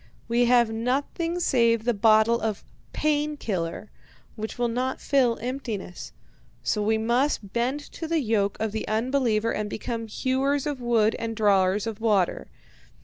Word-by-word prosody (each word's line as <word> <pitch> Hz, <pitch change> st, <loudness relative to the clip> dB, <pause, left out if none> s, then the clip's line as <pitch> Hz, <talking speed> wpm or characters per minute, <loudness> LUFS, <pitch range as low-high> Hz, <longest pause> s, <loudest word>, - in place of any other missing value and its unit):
We 240 Hz, +1 st, +2 dB
have 240 Hz, -2 st, +4 dB
nothing 280 Hz, +9 st, -1 dB
save 235 Hz, -8 st, +2 dB
the 240 Hz, +1 st, +1 dB
bottle 220 Hz, +2 st, +4 dB
of 220 Hz, -2 st, -2 dB, 0.3 s
"pain 300 Hz, 0 st, 0 dB
killer," 185 Hz, -3 st, -4 dB, 0.4 s
which 220 Hz, +2 st, -6 dB
will 240 Hz, 0 st, +1 dB
not 250 Hz, +3 st, -2 dB
fill 255 Hz, -4 st, +2 dB
emptiness, 235 Hz, -7 st, -5 dB, 0.5 s
so 210 Hz, -, 0 dB
we 220 Hz, +1 st, +2 dB
must 235 Hz, -2 st, 0 dB
bend 250 Hz, +5 st, 0 dB
to 325 Hz, -, -6 dB
the 330 Hz, 0 st, +1 dB
yoke 215 Hz, -6 st, 0 dB
of 220 Hz, -1 st, -1 dB
the 220 Hz, +1 st, -4 dB
unbeliever 230 Hz, -1 st, +1 dB
and 210 Hz, -1 st, -3 dB
become 230 Hz, +1 st, -4 dB
hewers 270 Hz, +4 st, 0 dB
of 290 Hz, -4 st, -3 dB
wood 225 Hz, -2 st, +2 dB
and 225 Hz, 0 st, -3 dB
drawers 200 Hz, -2 st, +2 dB
of 220 Hz, -1 st, -5 dB
water. 205 Hz, -6 st, +1 dB
230 Hz, 150 wpm, -25 LUFS, 215-260 Hz, 0.5 s, have